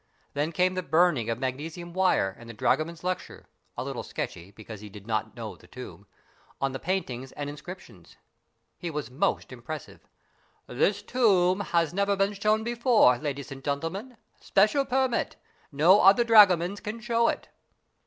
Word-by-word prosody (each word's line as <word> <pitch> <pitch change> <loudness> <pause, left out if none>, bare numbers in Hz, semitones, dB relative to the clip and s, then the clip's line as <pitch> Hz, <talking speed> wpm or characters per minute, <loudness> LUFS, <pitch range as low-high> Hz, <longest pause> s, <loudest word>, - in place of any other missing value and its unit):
Then 145 +3 -1
came 180 +2 +2
the 185 - -2
burning 160 -7 +2
of 115 - -1
magnesium 155 +7 -5
wire 180 - +2
and 115 0 -12
the 115 - -9
dragoman's 165 +9 0
lecture 185 0 -4 0.3
a - - -2
little - - -4
sketchy, 85 +3 -6
because 110 0 -11
he 105 - -9
did 100 0 -12
not 110 -1 -2
know - - -6
the - - -19
tomb - - -11 0.5
on 135 0 0
the 130 - -5
paintings 135 -9 -3
and 145 - -5
inscriptions. 145 - -12 0.6
He 175 - -4
was 150 -4 -5
most 170 +4 -1
impressive. 130 +5 -8 0.6
"This 200 +11 0
tomb 200 -6 +3 0.3
never 200 +1 +1
been 195 +1 +1
shown 215 +2 +1
before, 235 - +4
ladies 140 -1 -5
and 135 0 -9
gentlemen. 165 - -4 0.2
Special 215 +8 +2
permit. 260 -2 0 0.4
No 165 +8 +5
other 195 +5 +6
dragomans 200 -4 +5
can 215 +2 -6
show 230 0 +1
it." - - -2
175 Hz, 155 wpm, -27 LUFS, 135-200 Hz, 0.6 s, other